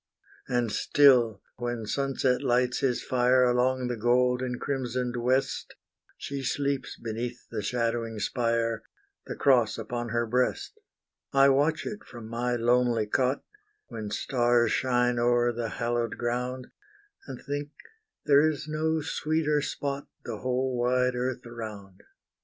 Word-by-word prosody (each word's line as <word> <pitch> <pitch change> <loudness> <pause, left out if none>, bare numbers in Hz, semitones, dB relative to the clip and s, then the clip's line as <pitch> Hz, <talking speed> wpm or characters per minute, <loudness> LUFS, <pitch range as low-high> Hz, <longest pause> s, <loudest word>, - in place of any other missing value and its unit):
And 120 -3 0
still, 125 -8 +4
when 120 -2 -3
sunset 135 +1 0
lights 125 -1 +1
his 125 -3 0
fire 125 0 +3
Along 125 +1 +2
the 120 - -2
gold 125 +2 +2
and 125 -1 -3
crimsoned 125 -2 -2
west, 125 +3 0 0.4
She 140 -1 -5
sleeps 140 +1 -2
beneath 115 +1 -5
the 110 -2 -3
shadowing 115 0 -1
spire, 115 +2 0 0.5
The - - -4
cross 120 -6 +3
upon 120 +1 -4
her 120 +1 0
breast. 125 - -1 0.5
I 135 0 +6
watch 155 +3 +2
it 215 +2 -6
from 120 - -10
my 120 +1 -1
lonely 120 -1 +2
cot, 130 +5 0 0.5
When 110 -2 -5
stars 120 +1 +2
shine 125 -2 +1
o'er 120 0 +3
the 115 -1 -3
hallowed 120 0 -2
ground, 125 +1 -3 0.6
And 130 -3 -7
think 145 +1 -4 0.6
there 145 +2 +5
is 150 -1 -5
no 160 +1 0
sweeter 150 -1 0
spot, 140 0 -4 0.2
The 115 -3 -4
whole 130 0 -1
wide 125 +1 +2
earth 125 0 -3
around. 105 -5 -8
125 Hz, 135 wpm, -28 LUFS, 120-130 Hz, 0.6 s, I